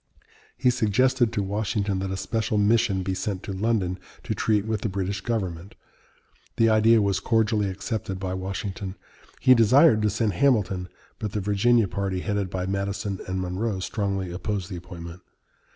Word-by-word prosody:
He 125 -1 +3
suggested 125 +1 +2
to 105 -3 -1
Washington 100 0 -1
that 95 0 -3
a 95 - -3
special 110 +1 -1
mission 105 -2 +2
be 95 0 -1
sent 95 0 -3
to 100 - -5
London 95 -3 0 0.2
to - - -2
treat 105 -2 +1
with 110 -2 -2
the 110 - -1
British 95 0 -3
government. 95 -5 -3 0.8
The 115 0 +4
idea 110 0 +5
was 100 -1 +1
cordially 110 -3 +1
accepted 95 0 -4
by 95 -1 -3
Washington. 95 +1 -4 0.4
He 130 - +6
desired 120 +2 +5
to 105 - +2
send 105 0 0
Hamilton, 95 -6 +1 0.3
but 105 -2 -4
the 105 - 0
Virginia 105 +3 +3
party, 95 -1 -2
headed 100 -2 -1
by 90 0 -3
Madison 100 0 -2
and 95 0 -2
Monroe, 95 +3 -2
strongly 100 -2 -2
opposed 100 +1 -3
the - - -4
appointment. 85 0 -9
100 Hz, 165 wpm, -25 LUFS, 95-110 Hz, 0.8 s, He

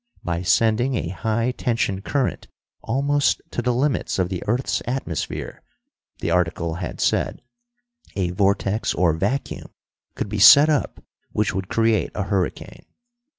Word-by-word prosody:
By 85 0 -2
sending 115 +7 +2
a 85 - -2
high 115 +5 -1
tension 115 -6 -1
current 135 +4 -2 0.3
almost 140 +4 +1
to - - -2
the 125 +1 +1
limits 130 +3 0
of 90 -2 0
the 95 -2 -4
earth's 120 +5 0
atmosphere, 120 - -4 0.6
the 85 - -1
article 85 -1 0
had 90 - -5
said, - - 0 0.7
a 90 -3 -1
vortex 100 +3 0
or 85 -3 +3
vacuum 100 - -3 0.5
could - - -3
be 105 +1 -4
set 145 +9 +9
up 150 -2 -1 0.3
which 105 -1 0
would 95 0 -3
create 115 -1 +1
a - - -1
hurricane. 95 -2 -3
105 Hz, 140 wpm, -22 LUFS, 90-125 Hz, 0.7 s, set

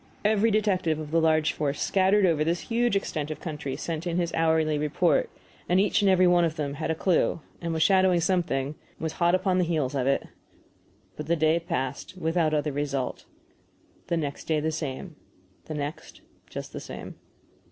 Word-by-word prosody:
Every 215 +1 +3
detective 195 -7 +1
of 155 -1 -7
the 165 0 +3
large 155 -1 +3
force 145 -1 -2
scattered 195 +1 +3
over 160 -4 +2
this 170 +2 0
huge 235 -1 +2
extent 155 -6 -2
of 155 - -5
country 150 -5 -5
sent 165 0 -4
his 175 0 -1
hourly 160 -2 +2
report, 150 - +2 0.4
and 180 +2 +4
each 205 +1 +2
and 200 - +4
every 185 -1 +5
one 175 -1 +5
of 165 -2 0
them 145 -3 -3
had 155 +2 -4
a 160 - +1
clue, 170 0 +1 0.2
and 170 -1 -2
was 160 -1 +2
shadowing 190 -2 +4
something, 165 -7 0
and 150 - -15
was 160 -1 -2
hot 170 +1 +5
upon 185 0 +1
the - - +3
heels 155 -6 -1
of 135 -2 0
it. 140 - +1 0.9
But 150 - -7
the 170 - +2
day 160 +1 +3
passed 165 0 -4
without 165 -2 +1
other 150 0 0
result. 140 -2 -3 0.8
The 170 - 0
next 145 -3 -4
day 155 -1 +1
the 160 +1 -1
same. 155 +2 -5 0.5
The 155 - -6
next 145 +1 -6 0.3
just - - -7
the - - -5
same. - - -8
160 Hz, 190 wpm, -27 LUFS, 150-180 Hz, 0.9 s, every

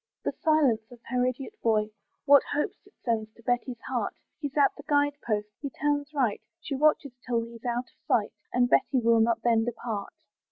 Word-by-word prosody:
The - - +1
silence 300 -8 +3
of 245 - -12
her 250 -1 +1
idiot 265 - -4
boy, 215 -2 +2 0.3
What 285 -1 +8
hopes 295 +6 -2
it 405 - -23
sends 220 -3 0
to 230 - -19
Betty's 245 0 -1
heart! - - -2 0.2
He's 285 -2 -5
at 280 -2 +4
the - - -10
guide 290 -1 +3
post 210 -2 -1
he 280 - -3
turns 290 +1 -1
right, 255 -8 0 0.2
She 310 - -5
watches 285 -1 +2
till 235 -2 0
he's 230 +1 -11
out 240 +1 -1
of - - -40
sight, 215 0 +2 0.2
And 245 0 +3
Betty 260 +2 +3
will 230 -1 +4
not 230 0 +2
then 230 -2 +3
depart. 225 -3 -4
245 Hz, 195 wpm, -28 LUFS, 230-285 Hz, 0.3 s, What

